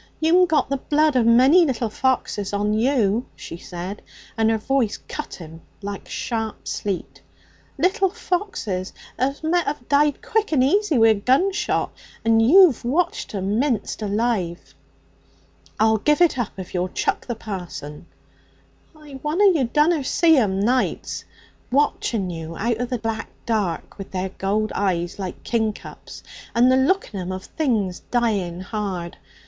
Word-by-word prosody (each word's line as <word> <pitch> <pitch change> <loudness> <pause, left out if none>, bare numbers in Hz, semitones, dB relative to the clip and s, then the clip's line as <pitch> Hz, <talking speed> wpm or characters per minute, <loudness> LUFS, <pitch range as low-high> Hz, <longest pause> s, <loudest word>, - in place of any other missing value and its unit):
'You'm 350 +3 +4
got 315 -2 +2
the 275 - -1
blood 300 +2 +1
of 240 -3 +3
a - - +6
many 265 +10 +6
little 240 -7 -1
foxes 215 -6 -1
on 205 +1 0
you,' 230 -1 +1
she - - -8
said, 180 +4 -7 0.3
and 225 -1 +2
her 225 - +2
voice 240 -1 0
cut 300 - -6
him 165 -1 -11 0.2
like 200 0 -6
sharp 225 -2 -4
sleet 195 -3 -4 0.6
'little 370 +5 +2
foxes 355 - -3 0.3
as 275 +4 -1
met 345 +2 +1
have 285 -4 -4
died 290 0 +2
quick 440 -3 0
and 270 -5 +3
easy 365 +1 +2
wi' 225 -1 +6
a - - +6
gunshot. 270 - +1 0.3
And 225 0 +4
you've 315 - +6
watched 310 -1 -1
'em 200 +3 -1
minced 255 -5 -1
alive.' 205 -4 -1 1.1
'I'll 220 0 +4
give 300 - +2
it 345 -4 +4
up 240 - -2
if 185 -2 -8
you'll 180 0 -1
chuck - - -2
the 240 - -2
parson.' 175 -8 -7 0.9
'I 295 -3 -11
won'er 310 +7 +1
you 300 -7 +1
dunna 300 +5 +2
see 325 +4 +4
'em, 200 -8 +2
nights, 245 +5 0 0.5
watching 235 -8 0
you 165 0 -7
out 230 +2 0
of 245 +1 -3
the 250 - -1
black 225 0 -4 0.2
dark 205 -6 -2
with 195 - -7
their 190 0 -3
gold 205 +3 -1
eyes, 180 -2 -1
like 185 -2 -6
kingcups, 220 -3 -4 0.3
and 245 +2 +5
the - - +5
look 310 - +1
in 195 - -4
'em 180 0 -4
of 185 0 -5
things 220 - -1
dying 200 -8 0
hard. 185 -4 -4
230 Hz, 155 wpm, -22 LUFS, 200-290 Hz, 1.1 s, a